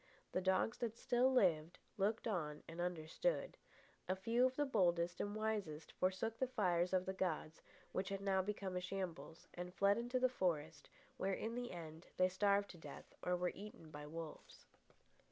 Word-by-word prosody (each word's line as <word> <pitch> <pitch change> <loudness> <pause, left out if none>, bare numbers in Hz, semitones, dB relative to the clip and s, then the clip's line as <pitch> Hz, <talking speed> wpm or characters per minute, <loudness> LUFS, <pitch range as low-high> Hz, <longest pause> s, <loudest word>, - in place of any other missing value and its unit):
The 185 - +1
dogs 190 +5 +2
that 230 -1 -2
still 250 +2 +3
lived, 175 -9 +3 0.2
looked 210 +4 +1
on 155 -8 -2
and 165 +1 -5
understood. 180 - 0 0.5
A 185 - +3
few 230 +6 +3
of 260 - -5
the 290 - +2
boldest 175 -7 +2
and 205 0 -2
wisest 205 -9 -2
forsook 190 +5 0
the 260 - +2
fires 180 -7 +2
of 185 -1 +2
the 190 - -1
gods, 165 -4 -2 0.3
which 185 0 -1
had 195 0 -2
now 195 -1 +3
become 195 -1 -3
a 180 - 0
shambles, 180 -3 -4
and 180 0 -5
fled 200 +4 +4
into 245 +2 0
the 255 - +5
forest, 165 -10 -1 0.3
where, 195 0 +1
in 225 - -3
the 245 0 -3
end, 165 -1 -8
they 185 0 +5
starved 200 +2 +3
to 175 - -13
death - - -10
or 180 - +1
were 180 0 0
eaten 195 -6 -10
by 150 0 -7
wolves. 160 0 -8
190 Hz, 180 wpm, -40 LUFS, 170-215 Hz, 0.5 s, the